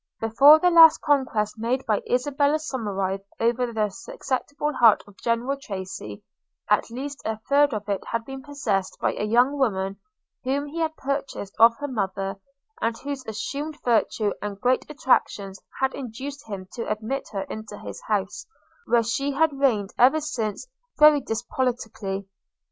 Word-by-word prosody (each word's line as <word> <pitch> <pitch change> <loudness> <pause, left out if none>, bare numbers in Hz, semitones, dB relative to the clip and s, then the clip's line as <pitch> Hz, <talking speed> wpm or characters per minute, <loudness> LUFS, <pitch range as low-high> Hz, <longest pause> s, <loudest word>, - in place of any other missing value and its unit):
Before 270 +7 +7
the 355 +3 +3
last 330 -2 +8
conquest 245 -7 0
made 250 +4 -1
by 215 -2 +1
Isabella 285 +4 +2
Somerive 200 -10 -3 0.2
over 240 +1 +1
the 215 -2 0
susceptible 295 - -3
heart 230 -5 +5
of 205 - -17
General 235 +5 0
Tracy, 190 - -7 0.4
at - - +2
least 275 +4 -6
a 220 0 -2
third 285 0 +4
of 210 -2 -4
it 200 -1 -2
had 230 -1 -2
been 270 +1 -7
possessed 260 -9 -2
by - - 0
a - - -4
young 245 +6 +3
woman, 195 -6 0 0.5
whom 275 +3 -1
he 300 +3 -6
had 320 -1 -1
purchased 275 -7 -4
of 230 +1 +7
her 290 - -4
mother, 195 -5 -3 0.4
and 230 0 0
whose 280 0 -5
assumed 285 +8 -4
virtue 220 -3 +1
and 205 -1 -5
great 250 +5 +1
attractions 205 -9 0 0.2
had 265 0 +1
induced 270 +2 -7
him 195 -3 -6
to 230 -3 -4
admit 220 +6 -3
her 200 -2 -3
into 220 -1 -8
his - - -8
house, 200 -2 -2 0.4
where 235 -1 +3
she 275 +5 -1
had 315 +1 +2
reigned 240 -8 +1
ever 265 +6 +6
since 240 - -3 0.3
very 300 -1 +7
despotically. 225 -5 -3
240 Hz, 155 wpm, -24 LUFS, 210-280 Hz, 0.5 s, last